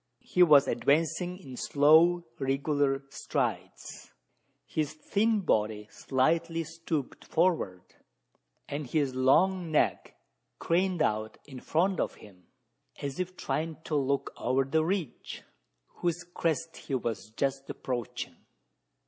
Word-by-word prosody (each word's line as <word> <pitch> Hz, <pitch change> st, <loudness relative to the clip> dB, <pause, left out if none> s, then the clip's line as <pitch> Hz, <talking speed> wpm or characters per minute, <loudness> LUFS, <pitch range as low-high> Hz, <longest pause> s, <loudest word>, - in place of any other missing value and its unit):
He 180 Hz, -, 0 dB
was 150 Hz, -5 st, +7 dB
advancing 165 Hz, +7 st, +1 dB
in 135 Hz, -9 st, -10 dB
slow 160 Hz, +7 st, +5 dB, 0.2 s
irregular 135 Hz, 0 st, 0 dB
strides, -, -, -4 dB, 0.6 s
his 155 Hz, -1 st, -2 dB
thin 210 Hz, +7 st, +1 dB
body 105 Hz, -, 0 dB
slightly 165 Hz, +5 st, 0 dB
stooped 165 Hz, -3 st, -4 dB
forward, 160 Hz, -, 0 dB, 0.8 s
and 145 Hz, -1 st, -4 dB
his 140 Hz, 0 st, 0 dB
long 170 Hz, +8 st, +3 dB
neck 155 Hz, -, +1 dB, 0.4 s
craned 180 Hz, -1 st, +1 dB
out 110 Hz, +1 st, -1 dB
in 135 Hz, -3 st, -9 dB
front 180 Hz, +7 st, +1 dB
of -, -, -1 dB
him 90 Hz, -4 st, -17 dB, 0.5 s
as 140 Hz, +2 st, -5 dB
if 185 Hz, 0 st, -3 dB
trying 155 Hz, +4 st, -2 dB
to 155 Hz, -, -3 dB
look 140 Hz, -1 st, 0 dB
over 130 Hz, +2 st, +1 dB
the 155 Hz, +4 st, +1 dB
ridge, 175 Hz, -5 st, -3 dB, 0.5 s
whose 175 Hz, 0 st, -1 dB
crest 165 Hz, 0 st, -1 dB
he 135 Hz, -, -4 dB
was 115 Hz, -4 st, -3 dB
just 135 Hz, 0 st, -1 dB
approaching. 120 Hz, -4 st, -4 dB
150 Hz, 115 wpm, -29 LUFS, 135-170 Hz, 0.8 s, was